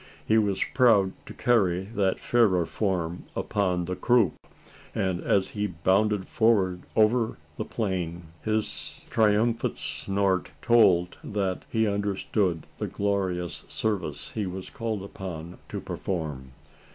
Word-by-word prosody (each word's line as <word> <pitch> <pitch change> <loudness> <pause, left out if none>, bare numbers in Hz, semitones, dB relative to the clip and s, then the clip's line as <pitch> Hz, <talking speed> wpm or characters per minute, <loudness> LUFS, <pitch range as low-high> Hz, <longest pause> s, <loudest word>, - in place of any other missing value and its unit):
He 110 +1 +4
was 100 -3 +1
proud 115 -7 +5 0.2
to - - -8
carry 95 -8 +2
that 100 -2 0
fairer 100 -8 +3
form 90 -3 -2
upon 90 -4 0
the 90 +1 -3
croup; 115 -4 +3 0.6
and, 95 -2 0
as 95 -1 +2
he 105 0 -2
bounded 95 +3 +1
forward 95 -6 +2
over 110 +1 +3 0.2
the - - -2
plain, 90 -6 -2 0.2
his 110 0 -2
triumphant 110 +2 +2
snort 95 -2 -1
told, 95 -8 +4
that 95 -3 -2
he 110 -1 +2
understood 100 -3 0
the - - -1
glorious 95 -4 -1
service 85 -10 -2
he 105 -3 -2
was 90 +1 -6
called 115 -7 -3
upon 90 -4 -7
to - - -4
perform. 75 -8 -4
100 Hz, 125 wpm, -27 LUFS, 90-110 Hz, 0.6 s, proud